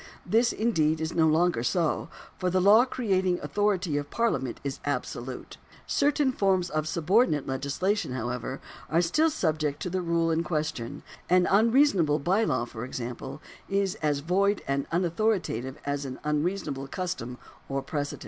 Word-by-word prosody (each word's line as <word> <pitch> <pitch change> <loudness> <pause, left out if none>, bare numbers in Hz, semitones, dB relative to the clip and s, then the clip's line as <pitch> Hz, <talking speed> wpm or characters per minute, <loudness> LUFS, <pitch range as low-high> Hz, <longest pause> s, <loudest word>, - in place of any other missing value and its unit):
This, 235 +2 +3
indeed, 160 -9 +1
is 160 0 -3
no 160 -1 +3
longer 160 -4 +2
so; 155 +6 0 0.3
for 185 - 0
the 185 +1 +2
law 210 +6 +6
creating 190 -8 0
authority 195 -7 0
of 145 0 -3
Parliament 225 - -1
is 140 -1 -4
absolute. 130 -2 -4 0.3
Certain 290 -1 +2
forms 190 -6 +1
of 155 0 -1
sub 165 +2 -4
ordinate 195 - +4
legislation, 140 +9 -1
however, 125 +2 -3 0.3
are 165 +2 +3
still 305 - +3
subject 155 - -1
to 180 - -3
the 185 0 -1
rule 170 -1 +1
in 160 0 +1
question; 150 -5 -3 0.3
an 180 0 +5
unreasonable 210 - +4
by 185 +9 +1
law, 130 - 0
for 115 -1 -8
example, 125 +3 -6 0.3
is 195 -1 +1
as 145 -2 +1
void 195 +6 +1
and 140 0 -1
unauthoritative 170 - 0
as 145 0 -2
an 130 -2 -6
unreasonable 150 -2 -1
custom 135 -8 -4 0.3
or 135 0 -2
precedent. 145 0 -3
165 Hz, 155 wpm, -27 LUFS, 140-195 Hz, 0.3 s, law